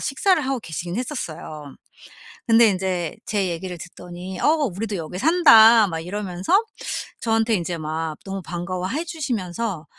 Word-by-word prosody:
식사를 320 Hz, +5 st, +2 dB
하고 265 Hz, -2 st, -1 dB
계시긴 175 Hz, +1 st, -5 dB
했었어요. 160 Hz, -, -5 dB, 0.7 s
근데 230 Hz, 0 st, +6 dB
인제 185 Hz, -3 st, -2 dB
제 200 Hz, -3 st, 0 dB
얘기를 175 Hz, +1 st, -5 dB
듣더니 180 Hz, +2 st, -9 dB
"어 -, -, +3 dB, 0.3 s
우리도 210 Hz, +1 st, -3 dB
여기 165 Hz, +3 st, -6 dB
산다." 230 Hz, -, +7 dB
막 165 Hz, -2 st, -4 dB
이러면서 190 Hz, -, 0 dB, 0.6 s
저한테 225 Hz, 0 st, +1 dB
인제 170 Hz, -1 st, -2 dB
막 155 Hz, 0 st, -3 dB
너무 195 Hz, -1 st, -5 dB
반가워해 185 Hz, -, -4 dB
주시면서 230 Hz, -, -3 dB
190 Hz, 310 characters per minute, -22 LUFS, 175-230 Hz, 0.7 s, 산다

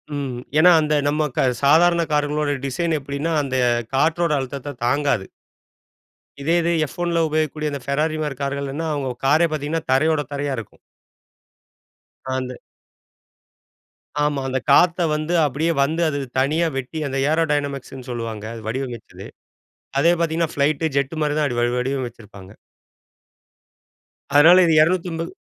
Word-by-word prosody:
ம் 135 Hz, -4 st, -4 dB, 0.2 s
ஏன்னா 180 Hz, +3 st, +7 dB
அந்த 150 Hz, 0 st, 0 dB
நம்ம 150 Hz, +1 st, +1 dB
க -, -, +3 dB, 0.2 s
சாதாரண 170 Hz, +4 st, +5 dB
காருங்களோட 150 Hz, 0 st, 0 dB
டிசைன் 165 Hz, +4 st, -1 dB
எப்டினா 140 Hz, +4 st, -3 dB
அந்த 130 Hz, -1 st, -3 dB, 0.4 s
காற்றோட 165 Hz, +3 st, +2 dB
அழுத்தத்த 135 Hz, +1 st, -6 dB
தாங்காது. 140 Hz, -5 st, +1 dB, 1.2 s
இதே 165 Hz, +4 st, +1 dB
இது 170 Hz, -, +1 dB
எஃப் -, -, -14 dB
ஒன்ல 170 Hz, -1 st, +1 dB
உபயோகிக்கக்கூடிய 155 Hz, 0 st, -1 dB
அந்த 140 Hz, -, -4 dB
பெராரி 155 Hz, +3 st, 0 dB
மாதிரி 145 Hz, -3 st, -3 dB
கார்கள்னா, 140 Hz, +3 st, -3 dB
அவங்க 135 Hz, -4 st, -3 dB
காரே 155 Hz, +5 st, +4 dB
பார்த்தீங்கன்னா 155 Hz, +2 st, -2 dB
தரையோட 155 Hz, +3 st, +3 dB
தரையா 145 Hz, 0 st, -2 dB
இருக்கும். 110 Hz, -, -9 dB, 1.6 s
அந்த 125 Hz, -1 st, -5 dB, 1.7 s
ஆமா. 145 Hz, -2 st, -1 dB
அந்த 130 Hz, -, 0 dB
காத்த 175 Hz, -1 st, +4 dB
வந்து 155 Hz, +3 st, -2 dB
அப்டியே 150 Hz, +5 st, 0 dB
வந்து 160 Hz, +5 st, 0 dB
அது 145 Hz, -2 st, -2 dB, 0.2 s
தனியா 155 Hz, +6 st, +2 dB
வெட்டி 135 Hz, +4 st, -4 dB
அந்த 135 Hz, 0 st, -3 dB
ஏரோடைனமிக்ஸ்ன்னு 145 Hz, -5 st, -2 dB
சொல்லுவாங்க 115 Hz, -3 st, -5 dB
அது 115 Hz, -, -9 dB
வடிவமைச்சது. 125 Hz, -1 st, -6 dB, 0.7 s
அதே 170 Hz, +4 st, +4 dB
பார்த்தீங்கன்னா 165 Hz, -1 st, 0 dB
ஃப்ளைட், 145 Hz, +2 st, +1 dB
ஜெட்டு 140 Hz, +3 st, 0 dB
மாதிரி 150 Hz, -1 st, 0 dB
தான் 150 Hz, -, +2 dB
அப்டி 120 Hz, -3 st, -2 dB
வடிவ 120 Hz, +1 st, 0 dB
வடிவமைச்சிருப்பாங்க. 120 Hz, -7 st, -6 dB, 1.9 s
அதனால 165 Hz, +5 st, +8 dB
இது 165 Hz, -, +3 dB
280 170 Hz, 0 st, 0 dB
145 Hz, 130 wpm, -21 LUFS, 135-160 Hz, 1.9 s, அதனால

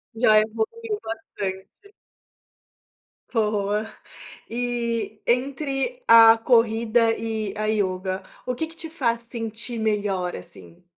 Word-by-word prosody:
Já 220 Hz, -2 st, +5 dB
evoluiu 415 Hz, -, -2 dB
bastante. 220 Hz, -, -7 dB, 1.4 s
Boa. 210 Hz, -1 st, 0 dB, 0.6 s
E 235 Hz, -1 st, -2 dB
entre 275 Hz, -, -1 dB
a 225 Hz, 0 st, +9 dB
corrida 230 Hz, -1 st, +3 dB
e 220 Hz, -3 st, -3 dB
a 215 Hz, -, -1 dB
yoga, 190 Hz, -3 st, -1 dB, 0.2 s
o 250 Hz, -, -1 dB
que 320 Hz, +6 st, -2 dB
que 325 Hz, -, -13 dB
te 325 Hz, 0 st, -5 dB
faz 235 Hz, -8 st, -1 dB
sentir 230 Hz, 0 st, -5 dB
melhor, 205 Hz, -4 st, -1 dB
assim? 90 Hz, -, -13 dB
225 Hz, 105 wpm, -24 LUFS, 210-245 Hz, 1.4 s, a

